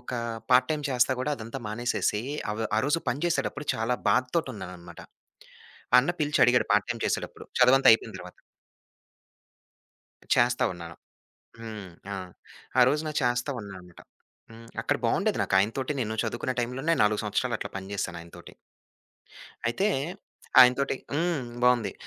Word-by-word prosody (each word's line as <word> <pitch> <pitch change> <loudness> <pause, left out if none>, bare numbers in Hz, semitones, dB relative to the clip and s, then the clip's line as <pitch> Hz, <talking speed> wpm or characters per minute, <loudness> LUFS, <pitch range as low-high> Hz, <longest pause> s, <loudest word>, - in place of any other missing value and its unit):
ఒక 125 - -9 0.4
part 125 0 +5
time 150 -2 -1
చేస్తా 125 0 +3
కూడా 150 - -1
అదంతా 115 +3 -7
మానేసేసి. 110 -1 -1 0.3
అవి 110 +1 -3
ఆరోజు 145 +7 +1
పని 140 +6 -4
చేసేటప్పుడు 165 -3 -1
చాలా 115 +3 0 0.2
బాధతోటున్నానన్నమాట. 95 - -2 1.0
అన్న 140 +7 -1
పిలిచి 150 0 0
అడిగాడు, 125 0 +3
పార్ట్ 105 +3 +2
టైమ్ 115 -2 -3
చేసేటప్పుడు - - -3 0.2
చదువంతా 130 +2 +6
అయిపోయిన 110 - 0
తరువాత. - - -11 2.0
చేస్తా 120 +1 +2
ఉన్నాను. 85 -2 -9 0.7
హ్మ్. 110 -4 -7 0.2
ఆ! - - -3 0.6
ఆ - - +7
రోజున 150 +2 -1
చేస్తా 125 +2 0
ఉన్నాననమాట. 95 -4 -11 0.5
హ్మ్. 115 0 -13 0.2
అక్కడ - - +1
బాగుండేది. - - +1
నాకాయన 95 +4 +2
తోటి 135 +3 -2
నేను 110 -2 -3
చదువుకునే 125 +1 -3
టైమ్‌లోనే, 135 +7 -1
4 105 0 +2
సంవత్సరాలు 105 - -1
అట్లా - - -6
పని 95 +1 -8
చేశాను 90 -3 -3
ఆయన 85 0 -14
తోటి. - - -13 1.1
అయితే 155 - +1 0.7
ఆయనతోటి 125 +2 +5 0.2
హ్మ్ 160 -2 0 0.2
బావుంది. 120 -5 +3
120 Hz, 135 wpm, -27 LUFS, 105-135 Hz, 2.0 s, ఆ